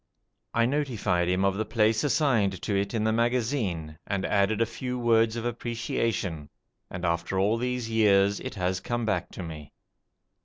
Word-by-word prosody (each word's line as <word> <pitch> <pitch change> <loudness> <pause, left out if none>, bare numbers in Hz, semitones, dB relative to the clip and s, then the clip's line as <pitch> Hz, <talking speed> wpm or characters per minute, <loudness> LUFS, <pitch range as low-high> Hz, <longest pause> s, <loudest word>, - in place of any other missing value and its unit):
I 115 0 +4
notified 115 -11 0
him 90 +2 +2
of 95 - +3
the 110 - 0
place 110 0 +2
assigned 120 - +2
to 100 - -1
it 100 +2 -1
in 110 - 0
the 110 - +2
magazine, 115 - -1
and 100 -1 -1
added 100 +2 +2
a 115 - +3
few 125 +3 -4
words 115 -2 +3
of 115 0 -4
appreciation, 115 -8 -2 0.4
and 90 0 -5
after 85 +2 -1
all 105 +4 +2
these 125 0 -2
years 105 -3 +3
it - - -6
has 90 -1 -1
come 120 +2 -2
back 95 -5 -1
to 95 - -6
me. 75 -3 -9
110 Hz, 170 wpm, -27 LUFS, 95-115 Hz, 0.4 s, I